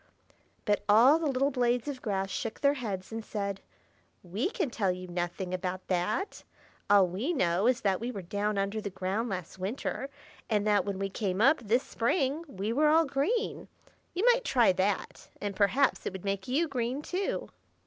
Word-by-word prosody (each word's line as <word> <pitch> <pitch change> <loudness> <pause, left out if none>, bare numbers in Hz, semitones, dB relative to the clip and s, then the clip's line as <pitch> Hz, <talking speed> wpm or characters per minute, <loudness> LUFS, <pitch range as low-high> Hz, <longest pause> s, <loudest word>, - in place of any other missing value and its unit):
But 205 -1 +1
all 245 +9 +7
the 325 - 0
little 275 +1 +1
blades 245 -1 +1
of 275 -3 -4
grass 195 -3 -2
shook 225 - -4
their 280 0 +4
heads, 210 -9 -5
and 225 0 -4
said, 200 -2 -4 0.6
"We 200 - -1
can 360 - -2
tell 200 -5 +1
you 185 0 -6
nothing 175 +1 -3
about 185 0 -3
that. 185 - -1 0.5
All 200 -2 +7
we 200 - -2
know 185 - +2
is 250 -1 +2
that 195 -2 +1
we 235 - -3
were 200 -6 -5
down 205 +3 -1
under 200 +2 -1
the 205 - -4
ground 190 +5 -2
last 185 -1 -5
winter, 235 +7 -3 0.4
and 210 -2 +1
that 205 -3 +3
when 200 -2 -2
we 195 0 -2
came 195 -2 -2
up 275 +8 +5
this 240 +3 +1
spring, 275 +5 0
we 205 -3 -3
were 300 +4 +3
all 320 +2 +5
green. 345 - -1 0.5
You 380 +6 +1
might - - -2
try 245 - +4
that, 190 +2 -2
and 205 -1 -3
perhaps 230 +8 +2
it - - -3
would 190 0 -8
make 195 -1 -2
you 295 +7 +1
green, 260 0 -2
too." 370 +4 -2
215 Hz, 190 wpm, -30 LUFS, 190-270 Hz, 0.6 s, all